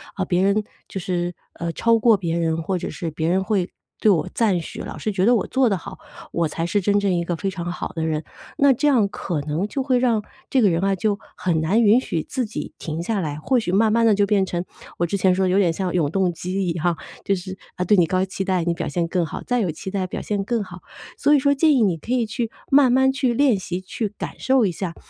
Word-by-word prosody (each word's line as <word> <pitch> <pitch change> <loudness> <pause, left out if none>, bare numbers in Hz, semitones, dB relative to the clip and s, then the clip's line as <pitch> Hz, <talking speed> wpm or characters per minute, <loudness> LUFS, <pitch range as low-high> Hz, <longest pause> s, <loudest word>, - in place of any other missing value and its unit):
啊， 190 - -1
别 180 0 +1
人 200 +2 +2 0.2
就 190 - -5
是， 175 0 -2 0.2
呃， 170 0 -4
超 230 0 +3
过 225 0 +5
别 170 -3 -2
人， 165 -1 0
或 185 +3 -1
者 - - -4
是 170 -4 -4
别 160 +1 -2
人 190 +2 +2
会 190 -3 0 0.3
对 215 - +4
我 170 - +1
赞 205 -7 +2
许， 160 - -7
老 - - -7
是 215 - -2
觉 190 -1 +1
得 240 +2 +5
我 - - 0
做 260 -3 +2
得 195 - +1
好， 190 +2 -10 0.3
我 170 -2 0
才 165 +2 -3
是 200 +4 0
真 205 +2 +2
正 200 -2 +1
一 170 -1 0
个 175 0 -2
非 195 +3 -2
常 175 -1 -4
好 - - -5
的 160 -1 -3
人， 155 0 -1 0.3
那 280 -1 +5
这 295 +5 0
样 235 -8 +4
可 175 -5 -4
能 155 +7 -2
就 265 +5 -3
会 255 -2 +2
让 230 -4 +2 0.3
这 265 - +2
个 205 - +5
人 165 +3 0
啊 195 0 +2
就 205 +2 -1 0.2
很 165 -3 0
难 205 +9 +2
允 220 +4 +5
许 160 -10 -2
自 260 - -2
己 210 - -6
停 160 0 -4
下 210 +2 -1
来。 150 -4 -3
或 245 +11 +1
许 180 - -2
慢 215 +2 +3
慢 230 0 +3
地 220 -2 +5
就 205 0 +3
变 200 -1 +2
成 175 -1 -3 0.3
我 175 - +1
之 185 +4 -1
前 185 -1 +3
说 190 - +1
的 - - +1
有 190 +2 +3
点 175 -4 +3
像 180 +1 -3
永 160 -5 +1
动 185 0 +1
机 185 +3 -3
一 170 - +1
样， 170 0 0 0.3
就 200 - +1
是， 190 +1 -7 0.2
啊， 180 - -2
对 210 - +4
你 175 -3 +4
高 185 0 +1
期 190 0 -4
待， 185 -2 0
你 170 0 0
表 - - -4
现 170 +3 -1
更 180 0 0
好， 160 - -5
再 245 -1 +1
有 190 -6 0
期 160 +4 -6
待 190 -2 -1
表 - - -5
现 205 -2 -2
更 230 +1 -1
好。 180 -2 -10 0.4
所 295 - +3
以 - - +6
说 280 +1 +3
建 305 +2 +3
议 245 -5 +4
你 185 -5 +2
可 230 - -8
以 250 -2 +2
去 230 +1 -3 0.2
慢 275 -2 +6
慢 265 +1 +4
去 255 -2 0
练 275 -4 +4
习， 180 -1 -4
去 205 +3 -3
感 - - -6
受 260 -3 +3
一 185 - +1
下。 170 0 -5
190 Hz, 295 characters per minute, -22 LUFS, 175-220 Hz, 0.4 s, 以